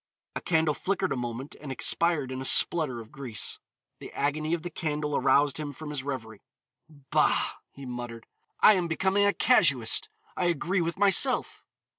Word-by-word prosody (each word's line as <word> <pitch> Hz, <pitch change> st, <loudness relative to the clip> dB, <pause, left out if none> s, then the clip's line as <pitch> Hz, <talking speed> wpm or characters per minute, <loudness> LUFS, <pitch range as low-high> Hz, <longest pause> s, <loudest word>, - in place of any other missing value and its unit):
A -, -, -3 dB
candle 160 Hz, -3 st, +1 dB
flickered 190 Hz, +3 st, -2 dB
a -, -, 0 dB
moment 125 Hz, +2 st, -5 dB
and 145 Hz, -3 st, -7 dB
expired 150 Hz, 0 st, +2 dB
in 130 Hz, 0 st, -5 dB
a -, -, -4 dB
splutter 140 Hz, -2 st, +2 dB
of 115 Hz, -1 st, -12 dB
grease. 130 Hz, -7 st, -4 dB, 0.4 s
The -, -, -10 dB
agony 155 Hz, +3 st, -1 dB
of 165 Hz, -, -8 dB
the 175 Hz, -, -6 dB
candle 150 Hz, -2 st, -3 dB
aroused 140 Hz, +1 st, +2 dB
him 145 Hz, -2 st, -5 dB
from 150 Hz, +2 st, -8 dB
his 145 Hz, -3 st, -3 dB
revery. 115 Hz, -6 st, -6 dB, 0.5 s
"Bah," 145 Hz, -3 st, 0 dB
he 140 Hz, -, -12 dB
muttered, 120 Hz, -2 st, -7 dB, 0.4 s
"I 215 Hz, -, +8 dB
am 180 Hz, -3 st, 0 dB
becoming 190 Hz, +5 st, +1 dB
a -, -, +4 dB
casuist, 140 Hz, -, +2 dB, 0.3 s
I 180 Hz, -, 0 dB
argue 175 Hz, +2 st, 0 dB
with 170 Hz, +1 st, -3 dB
myself." 205 Hz, +6 st, +3 dB
150 Hz, 170 wpm, -27 LUFS, 130-170 Hz, 0.5 s, I